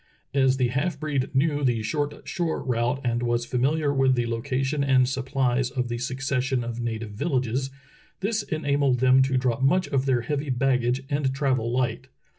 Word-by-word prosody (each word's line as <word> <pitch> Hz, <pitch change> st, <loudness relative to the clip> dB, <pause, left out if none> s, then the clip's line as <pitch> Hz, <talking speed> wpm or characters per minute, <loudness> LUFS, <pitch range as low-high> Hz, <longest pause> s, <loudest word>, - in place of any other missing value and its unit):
As 130 Hz, -1 st, +3 dB
the 125 Hz, -2 st, +1 dB
half 145 Hz, +8 st, -1 dB
breed 145 Hz, -4 st, -1 dB
knew 145 Hz, +1 st, +2 dB
the 120 Hz, -4 st, +1 dB
short 145 Hz, +4 st, -3 dB
shore 170 Hz, -2 st, -2 dB
route 125 Hz, +1 st, 0 dB
and 120 Hz, -1 st, 0 dB
was 120 Hz, 0 st, 0 dB
famihar 140 Hz, +4 st, 0 dB
with 135 Hz, -1 st, +3 dB
the 120 Hz, -1 st, 0 dB
location 130 Hz, +5 st, -1 dB
and 130 Hz, -2 st, +4 dB
supplies 130 Hz, -1 st, 0 dB
of 125 Hz, -2 st, -3 dB
the 120 Hz, 0 st, -3 dB
succession 130 Hz, 0 st, -1 dB
of 120 Hz, 0 st, -4 dB
native 115 Hz, -2 st, -4 dB
villages, 130 Hz, +1 st, -1 dB, 0.5 s
this 215 Hz, +2 st, 0 dB
enabled 140 Hz, -6 st, 0 dB
them 130 Hz, +1 st, +5 dB
to 130 Hz, 0 st, +2 dB
drop 125 Hz, -1 st, 0 dB
much 180 Hz, +7 st, +3 dB
of 135 Hz, 0 st, 0 dB
their 125 Hz, -3 st, +2 dB
heavy 145 Hz, +4 st, -3 dB
baggage 125 Hz, 0 st, +1 dB
and 140 Hz, -2 st, +1 dB
travel 130 Hz, -5 st, 0 dB
light. 125 Hz, +1 st, -1 dB
130 Hz, 175 wpm, -25 LUFS, 125-140 Hz, 0.5 s, them